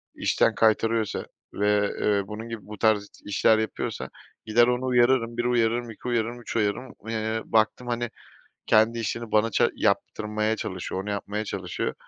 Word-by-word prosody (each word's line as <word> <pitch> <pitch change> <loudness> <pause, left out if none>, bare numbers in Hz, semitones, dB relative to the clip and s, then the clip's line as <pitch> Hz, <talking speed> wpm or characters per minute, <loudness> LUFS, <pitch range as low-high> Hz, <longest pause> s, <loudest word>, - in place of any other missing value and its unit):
işten - - +2
kaytarıyorsa 110 0 +2 0.3
ve, 105 0 +2
eee, 100 -2 +1
bunun 110 +3 -7
gibi 115 -3 -7
bu 105 - -8
tarz 105 -1 +2 0.2
işler 105 +2 +3
yapıyorsa 110 - -3 0.4
gider 120 +2 +4
onu 125 +1 0
uyarırım, 120 -1 +3
1 120 - 0
uyarırım, 120 0 +1
2 115 - -10
uyarırım, 120 0 -1
3 115 - -7
uyarırım. 110 +3 -1 0.2
Eee, 110 0 -1
baktım, 110 +3 +1
hani, 120 -1 -1 0.6
kendi 110 +2 +4
işini 115 0 -3
bana 110 +1 +3
ça - - +3
yaptırmaya 105 +1 0
çalışıyor, 95 -3 -4
onu 105 - -6
yapmaya 105 +1 -3
çalışıyor. 90 -4 -3
110 Hz, 155 wpm, -26 LUFS, 105-120 Hz, 0.6 s, gider